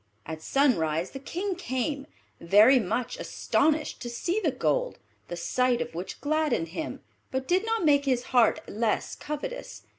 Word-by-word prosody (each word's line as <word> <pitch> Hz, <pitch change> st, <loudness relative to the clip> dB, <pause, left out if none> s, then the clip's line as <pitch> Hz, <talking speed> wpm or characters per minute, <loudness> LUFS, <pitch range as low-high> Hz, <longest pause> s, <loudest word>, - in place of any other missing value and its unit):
At 160 Hz, 0 st, -6 dB
sunrise 170 Hz, -, +1 dB
the 270 Hz, -, -7 dB
King 370 Hz, +8 st, -3 dB
came, 275 Hz, -2 st, -3 dB, 0.3 s
very 210 Hz, +9 st, +6 dB
much 245 Hz, -, -2 dB
astonished 310 Hz, -7 st, 0 dB
to 240 Hz, -, -4 dB
see 345 Hz, -, -1 dB
the 355 Hz, -8 st, +1 dB
gold; -, -, 0 dB, 0.3 s
the 175 Hz, -, -5 dB
sight 250 Hz, +7 st, +1 dB
of 245 Hz, 0 st, -4 dB
which 180 Hz, +3 st, -6 dB
gladdened 295 Hz, -, 0 dB
him, 310 Hz, -, -5 dB, 0.3 s
but 260 Hz, 0 st, -3 dB
did 375 Hz, +5 st, +2 dB
not 450 Hz, -5 st, 0 dB
make 285 Hz, -2 st, +4 dB
his 255 Hz, -3 st, +1 dB
heart 240 Hz, -3 st, +4 dB
less 220 Hz, 0 st, -1 dB
covetous. 300 Hz, +13 st, -6 dB
260 Hz, 155 wpm, -27 LUFS, 225-315 Hz, 0.3 s, very